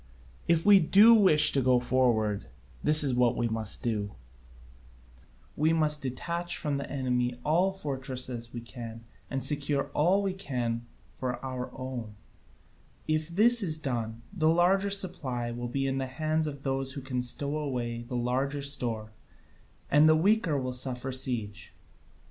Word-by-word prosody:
If 170 -1 +2
we 205 -1 +8
do 200 +7 +6
wish 190 -9 +5
to 135 - +1
go 125 -1 +3
forward, 120 -5 +1 0.3
this 150 0 +6
is 135 -3 +1
what 125 -1 +2
we 120 - 0
must 110 -2 -2
do: 105 -4 -2 1.4
we 155 +2 +2
must 150 -2 +1
detach 170 +7 -3
from 145 -2 -2
the 140 - -6
enemy 125 -2 -1
all 170 +5 +3
the 190 - -13
fortresses 130 -5 -4
we 120 - -6
can 115 0 -9 0.3
and 135 -2 -3
secure 140 0 -1
all 185 +7 +2
we 195 -1 -1
can 120 -9 -3 0.3
for 125 -1 -4
our 130 -1 -5
own: 125 -5 -6 0.9
if 155 0 0
this 225 +7 +4
is 160 -6 +1
done, 115 -6 -4
the 160 -5 +2
larger 185 +4 +3
supply 130 -12 0
will 120 +1 -5
be 135 +2 -2
in 135 0 -1
the 135 - -3
hands 155 +3 -1
of 140 -2 -7
those 135 -1 -2
who 140 - -6
can 130 -1 -3
stow 140 +4 -2
away 120 -5 -3
the 125 +1 -5
larger 135 +4 -1
store, 115 -6 -1 0.8
and 150 +2 +6
the 155 - +6
weaker 185 -2 +2
will 130 -1 -3
suffer 130 0 -1
siege. 110 -5 -3
135 Hz, 160 wpm, -28 LUFS, 120-155 Hz, 1.4 s, we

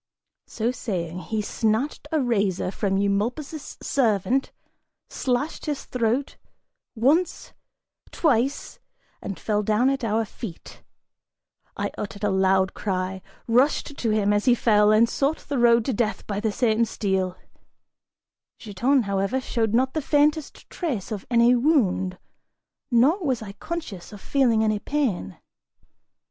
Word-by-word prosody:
So 230 +2 -1
saying, 180 -9 -4
he 215 +3 -3
snatched 225 +9 -1
a 315 - +2
razor 200 -8 0
from 195 -1 -1
Eumolpus' 235 +10 -2
servant, 245 +1 +1 0.6
slashed 260 +6 -2
his 295 -2 -3
throat, 250 +3 -1 0.6
once, 290 +10 +1 0.6
twice, 275 -3 0 0.4
and 195 - -6
fell 210 -1 0
down 220 +5 +2
at 275 -1 -3
our 225 0 +1
feet! 195 -4 -9 1.0
I - - -2
uttered 200 0 -6
a 205 - +2
loud 190 0 +2
cry, 190 -1 -3 0.3
rushed 265 +4 +2
to 235 - -2
him 210 -1 +2
as 205 0 0
he 250 -2 +5
fell, 210 -3 +4
and 220 +2 +5
sought 280 +6 -1
the 280 -3 -1
road 235 -1 +4
to 265 - 0
death 220 0 -1
by 205 -1 -3
the 220 0 0
same 225 0 +2
steel; 190 -5 -1 1.2
Giton, 245 +5 +1
however, 200 +5 0
showed 225 -4 -1
not 260 +2 +2
the 315 - -1
faintest 295 +1 +1
trace 255 - -3
of 205 -3 -5
any 235 0 +5
wound, 235 - +2 0.7
nor 280 - +3
was 255 -7 -1
I 200 - -7
conscious 225 - -7
of 205 - -10
feeling 235 -3 +2
any 215 -1 +1
pain. 215 - -2
225 Hz, 135 wpm, -24 LUFS, 200-265 Hz, 1.2 s, he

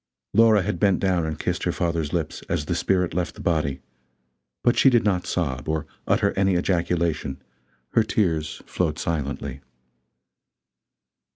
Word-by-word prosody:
Laura 110 -3 +5
had 105 +3 -2
bent 100 -3 +3
down 90 -4 +1
and 80 -1 -3
kissed - - -2
her - - 0
father's 85 -3 -1
lips 85 -3 -2
as 75 - -1
the 85 - -1
spirit 90 0 +1
left 90 0 -2
the - - -14
body; 75 -5 0 0.8
but 120 - +4
she 135 - +6
did 120 -3 +3
not 95 -4 0
sob, 70 -5 -2
or 80 -1 -1 0.2
utter - - +3
any 95 -1 +2
ejaculation; 85 -5 0 0.5
her 115 - +3
tears 80 -9 -1
flowed 80 -4 -1
silently. 70 -4 -3
85 Hz, 150 wpm, -24 LUFS, 75-95 Hz, 0.8 s, she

